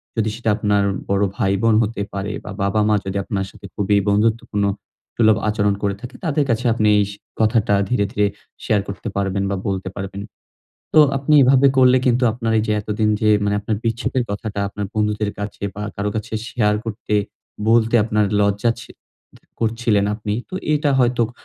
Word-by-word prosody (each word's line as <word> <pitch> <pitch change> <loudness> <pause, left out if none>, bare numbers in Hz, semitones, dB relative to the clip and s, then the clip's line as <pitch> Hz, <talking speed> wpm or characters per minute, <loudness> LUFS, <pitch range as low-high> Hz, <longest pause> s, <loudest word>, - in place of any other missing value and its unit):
যদি 110 -1 0
সেটা 115 -2 -2
আপনার 105 -2 +1 0.3
বড় 100 +1 +2
ভাই-বোন 105 +1 +2
হতে 110 -1 -3
পারে 100 +1 -3
বা 105 - -7
বাবা-মা 105 +2 +2
যদি 95 0 -3
আপনার 95 -1 -2
সাথে - - -14
খুবই 105 0 +2
বন্ধুত্বপূর্ণ 105 0 +1 0.5
সুলভ 110 -2 +4
আচরণ 105 -1 +1
করে 100 -1 0
থাকে 125 +1 -9
তাদের 150 -2 +1
কাছে 115 +2 0
আপনি 110 -2 +1
এই 105 - +4
সে 100 - -11 0.2
কথাটা 110 -1 +2 0.2
ধীরে, 105 -5 +1
ধীরে 105 -4 +2 0.4
share 105 -4 +1
করতে 100 +3 -6
পারবেন 100 0 -1
বা - - 0
বলতে 95 -1 -2
পারবেন। 100 +1 -5 0.7
তো 155 - +8 0.2
আপনি 140 +3 +1
এভাবে 135 +1 +5
করলে 130 -1 +6
কিন্তু 125 0 +3
আপনার 115 0 -2
এই 110 - +1
যে 105 - +1
এতদিন 105 +1 -1
যে 110 - +2 0.2
মানে 100 0 +1
আপনার 110 +1 -2
বিচ্ছেদের 120 +3 -1
কথাটা 100 0 -4
আপনার 100 0 -5
বন্ধুদের 105 -1 0
কাছে 100 0 -6
বা 105 - -6
কারো 105 +1 -1
কাছে 110 +2 -5 0.2
share 105 -3 +1
করতে, 110 -1 -4 0.5
বলতে 115 0 +3
আপনার 105 -1 +1 0.2
লজ্জা 100 +3 +2
ছি 115 - -12 0.5
ত - - -22 0.2
করছিলেন 115 -2 +1
আপনি। 105 -1 -3 0.2
তো - - -7 0.2
এটা 150 -1 +1
হয়তো 120 -1 +2
ক - - -12
105 Hz, 180 wpm, -20 LUFS, 100-115 Hz, 0.7 s, তো